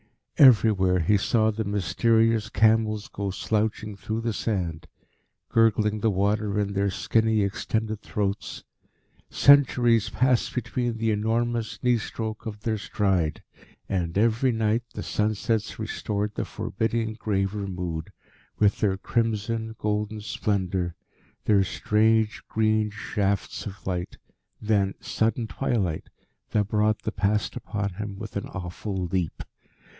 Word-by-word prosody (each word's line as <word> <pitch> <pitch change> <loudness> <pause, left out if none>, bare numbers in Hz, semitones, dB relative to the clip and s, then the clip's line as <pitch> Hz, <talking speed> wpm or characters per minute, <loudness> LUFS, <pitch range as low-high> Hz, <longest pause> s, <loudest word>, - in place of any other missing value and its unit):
Everywhere 105 -8 +6
he 100 +6 +3
saw 110 +2 +2
the 110 +1 -3
mysterious 110 +3 +2
camels 110 0 +2
go 100 -1 -4
slouching 105 +1 -1
through 110 +3 -4
the 115 -1 -1
sand, 85 -8 -2 0.6
gurgling 110 -1 +3
the 110 - +2
water 105 +1 0
in 100 -1 -1
their 100 0 +1
skinny, 110 +2 +1
extended 110 +2 -2
throats. 100 -1 -3 0.7
Centuries 120 -5 +5
passed 130 -2 +1
between 120 -1 -2
the 110 0 +1
enormous 115 +2 -1
knee 125 -1 +3
stroke 110 0 -5
of 105 -1 -6
their 110 -1 -1
stride. 95 -7 0 0.4
And, 90 -2 -1
every 115 +4 +3
night, 110 0 +1
the - - -4
sunsets 105 +1 -1
restored 105 -1 -3
the - - -3
forbidding, 115 +2 -2
graver 100 -2 -1
mood, 90 -4 -4 0.5
with 105 -1 +3
their 95 -3 +1
crimson, 110 +1 -1
golden 105 0 -2
splendour, 95 -4 -1 0.5
their 100 -2 +4
strange 110 +3 +1
green 110 -1 +2
shafts 100 0 -2
of 100 0 -10
light, 90 -1 -3 0.4
then 100 -3 +1
sudden 115 +1 0
twilight 105 -9 -2 0.4
that 105 -2 0
brought 110 0 +1
the 110 - -2
Past 105 0 0
upon 105 -1 -3
him 100 0 -6
with 110 +1 -8
an 100 - -3
awful 90 +1 -4
leap. 90 -2 -2
105 Hz, 125 wpm, -26 LUFS, 100-110 Hz, 0.7 s, Everywhere